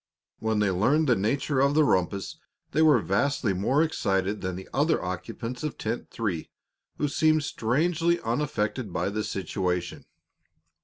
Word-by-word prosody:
When 110 -1 0
they 105 -2 +2
learned 130 - +2
the 125 - +4
nature 130 +7 0
of 140 +2 +3
the 155 - +5
rumpus 95 - 0 0.3
they 155 - +2
were 155 -4 +6
vastly 105 - +1
more 130 - +2
excited 100 - 0
than 95 -1 -3
the 95 - -8
other 150 +4 +2
occupants 115 +7 -5
of 150 -2 -4
Tent 115 +2 -4
Three, 100 -9 -3 0.5
who 145 - 0
seemed 155 +1 +2
strangely 165 +8 +1
unaffected 115 -3 -2
by - - -1
the 105 +1 -2
situation. 90 -2 -3
115 Hz, 150 wpm, -27 LUFS, 95-145 Hz, 0.5 s, were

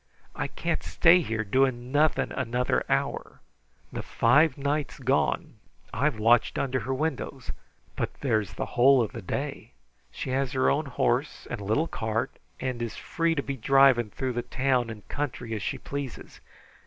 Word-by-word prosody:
I - - -2
can't - - -2
stay 175 +1 +5
here 110 -7 -2
doing 125 +2 +1
nothing 150 +2 +2
another 125 -1 0
hour. - - -1 0.5
The - - -3
five 150 +8 +3
nights 145 +1 -2
gone - - 0 0.4
I've 140 +1 +1
watched 115 +2 +3
under 130 -1 0
her 130 +4 -3
windows, 140 -3 -3 0.4
but - - -2
there's 110 -8 0
the - - -3
whole 130 +1 +5
of 110 - -4
the 115 - -7
day. 90 - -5 0.4
She's 135 +1 -2
her 130 -1 +3
own 150 +1 0
horse 125 +2 -1
and 120 -3 -4
little 110 +11 +1
cart, 115 +2 -2 0.3
and's 120 -4 -3
free 165 -1 -1
to 140 - -1
be 140 - -3
driving 130 -2 +4
through 130 +4 -3
the 120 - -1
town 130 -2 0
and 110 -2 -9
country 135 -5 -4
as 110 - -3
she - - -2
pleases. 140 -3 -7
130 Hz, 155 wpm, -27 LUFS, 115-140 Hz, 0.5 s, stay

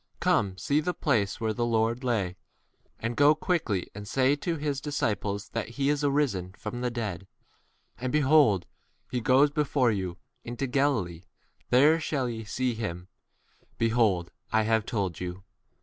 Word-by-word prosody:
Come, 95 -2 +1
see 140 +11 +1
the 175 +3 -2
place 110 -10 0
where 110 -1 0
the 120 - -1
Lord 115 +1 +1
lay. 105 -8 0 0.6
And 115 +1 -3
go 145 +3 +6
quickly, 155 - -1
and 105 0 -8
tell 140 - +1
his 145 -3 -2
disciples 105 -8 -2
that 115 -1 -3
he 140 0 +1
is 145 0 0
risen 135 -11 0
from 110 +4 -6
the 125 - 0
dead; 105 -6 -4 0.7
and, 125 0 -2
behold, 145 - +4 0.5
he 125 -1 -1
goeth 135 +5 +4
before 140 -5 +2
you 95 -4 -3 0.3
into 120 +3 -3
Galilee; 125 - 0 0.4
there 145 +6 +5
shall 140 -5 -1
ye 115 -2 -4
see 125 +4 -1
him: 90 -5 -5 0.7
lo, 110 -6 +2 0.3
I 110 - +3
have 110 0 +1
told 100 -8 -2
you. 90 +1 -6
120 Hz, 150 wpm, -28 LUFS, 100-140 Hz, 0.7 s, go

